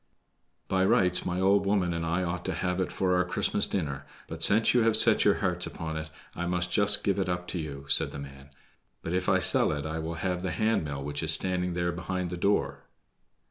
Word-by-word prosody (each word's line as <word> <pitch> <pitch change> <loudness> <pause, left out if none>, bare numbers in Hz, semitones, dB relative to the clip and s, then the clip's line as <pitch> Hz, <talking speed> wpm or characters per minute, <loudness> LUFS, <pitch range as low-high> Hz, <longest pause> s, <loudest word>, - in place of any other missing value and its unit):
"By 95 0 +1
rights 95 -4 +2
my 90 0 -2
old 100 +2 +3
woman 100 -3 0
and 85 0 -3
I 85 +3 -1
ought 90 +1 -3
to 95 - -2
have 90 +3 -2
it 95 - -2
for 90 -1 0
our 90 - +2
Christmas 90 - -1
dinner, 75 -8 -4 0.2
but 80 0 -8
since 110 +6 +4
you 125 - +4
have 110 -1 +4
set 110 -1 +4
your 105 - +4
hearts 90 -2 -2
upon 80 -1 -6
it 80 0 -5 0.3
I 85 - -3
must 90 0 -1
just 100 +2 +3
give 100 -1 0
it 95 - -1
up 90 0 -3
to 90 - -3
you," 70 -3 -7
said - - +2
the - - -8
man. 70 0 -11 0.5
"But 85 - -4
if 90 0 0
I - - +4
sell - - +3
it 75 -1 -4
I 80 +1 -4
will 80 +1 -4
have 90 +2 -2
the 95 - -3
hand 110 +4 0
mill 70 -2 -5
which 70 0 -4
is 80 -1 +2
standing 90 +1 +2
there 85 0 -1
behind 90 0 -4
the - - -3
door." 100 +4 -1
90 Hz, 235 wpm, -28 LUFS, 80-95 Hz, 0.5 s, since